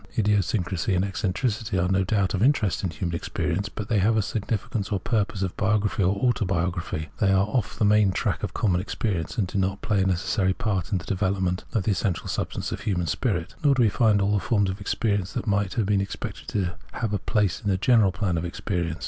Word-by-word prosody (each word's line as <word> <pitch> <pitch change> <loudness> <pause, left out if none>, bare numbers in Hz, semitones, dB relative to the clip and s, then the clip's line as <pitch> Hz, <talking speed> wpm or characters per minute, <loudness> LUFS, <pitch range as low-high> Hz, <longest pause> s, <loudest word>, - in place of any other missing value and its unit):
Idiosyncrasy 100 -3 +1
and 90 +2 +2
eccen 100 0 -1
tricity 110 -2 -1
are 90 -1 +2
no 95 +1 +2
doubt 100 -1 +1
of 100 - -1
interest 115 -8 +2
in 95 - 0
human 85 +2 -4
experience, 90 +4 -2
but 105 0 -6
they 110 -3 +2
have 110 +4 +3
a 110 - +2
significance 105 -1 -2
for 100 -3 -1
purposes 100 -1 -1
of 95 - -3
biography 105 0 +1
or 95 +2 +3
autobiography; 90 -8 -1
they 100 -2 +3
are 95 0 +4
off 110 0 -2
the 105 - +2
main 105 -1 +4
track - - -1
of - - -3
common 90 -5 +1
experience, 95 -4 -3
and 105 - +2
do 95 +2 -2
not 95 +1 -1
play 100 -3 +2
a - - +2
necessary 95 +1 +1
part 105 -4 -2
in 100 - +2
the 85 - -7
development 95 -2 -1
of 110 - +1
the 110 - +1
essential 95 -1 -1
substance - - -3
of - - -3
the - - -11
human 90 -5 0
spirit. 90 - -1
Nor 140 -2 +5
do 125 - +4
we 110 - +5
find 105 -2 +3
all 100 +1 +2
the 100 - +3
forms 100 -2 +1
of 95 +2 -8
experience 100 -2 -1
that 125 - -3
might 100 -3 0
have 110 - +1
been 100 0 +2
expected 100 - -6
to 95 -4 -1 0.2
have 110 -3 -2
a 105 - +1
place 105 -6 0
in 105 - -2
the 95 - +2
general 110 -2 +4
plan 90 -4 -1
of - - -4
experience. 85 -2 -2
100 Hz, 235 wpm, -25 LUFS, 95-105 Hz, 0.2 s, Nor